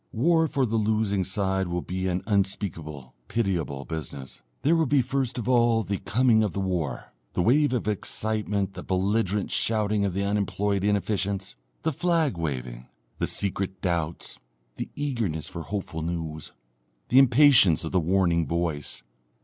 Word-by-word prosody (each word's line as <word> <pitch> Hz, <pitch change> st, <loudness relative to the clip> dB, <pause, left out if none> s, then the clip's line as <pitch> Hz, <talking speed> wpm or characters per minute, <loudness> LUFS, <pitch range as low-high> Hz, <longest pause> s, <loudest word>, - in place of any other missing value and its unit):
War 160 Hz, +7 st, +3 dB
for 135 Hz, -3 st, 0 dB
the 115 Hz, -1 st, -1 dB
losing 105 Hz, -2 st, +1 dB
side 95 Hz, 0 st, -1 dB
will 85 Hz, 0 st, -2 dB
be 95 Hz, +1 st, -3 dB
an 90 Hz, 0 st, -1 dB
unspeakable 85 Hz, -, -2 dB
pitiable 85 Hz, -11 st, -2 dB
business. 70 Hz, -6 st, -7 dB, 0.2 s
There 160 Hz, +4 st, +4 dB
will 165 Hz, -2 st, +2 dB
be 140 Hz, -1 st, +3 dB
first 135 Hz, -1 st, -2 dB
of 120 Hz, -, -4 dB
all 120 Hz, -3 st, +3 dB
the 100 Hz, +1 st, -3 dB
coming 110 Hz, +3 st, +3 dB
of 105 Hz, -5 st, 0 dB
the -, -, -3 dB
war, 90 Hz, -9 st, -3 dB, 0.2 s
the -, -, 0 dB
wave 145 Hz, +7 st, +4 dB
of 120 Hz, -4 st, -1 dB
excitement, 105 Hz, -1 st, -1 dB
the 90 Hz, -, -7 dB
belligerent 100 Hz, +2 st, 0 dB
shouting 105 Hz, -2 st, +1 dB
of 95 Hz, -3 st, -1 dB
the 100 Hz, -, 0 dB
unemployed 100 Hz, -1 st, 0 dB
inefficients, 100 Hz, -1 st, -1 dB, 0.3 s
the 160 Hz, -, 0 dB
flag 165 Hz, -, +1 dB
waving, 65 Hz, -7 st, -4 dB, 0.3 s
the -, -, 0 dB
secret 95 Hz, -1 st, -1 dB
doubts, 85 Hz, -3 st, -2 dB, 0.4 s
the -, -, -4 dB
eagerness 115 Hz, -, -2 dB
for 85 Hz, -, -6 dB
hopeful 80 Hz, -1 st, -4 dB
news, 80 Hz, -2 st, -4 dB, 0.6 s
the 130 Hz, -, +6 dB
impatience 130 Hz, -, +6 dB
of 80 Hz, -, -4 dB
the 95 Hz, -, +3 dB
warning 85 Hz, -2 st, +2 dB
voice. 80 Hz, -5 st, -3 dB
100 Hz, 155 wpm, -26 LUFS, 85-115 Hz, 0.6 s, the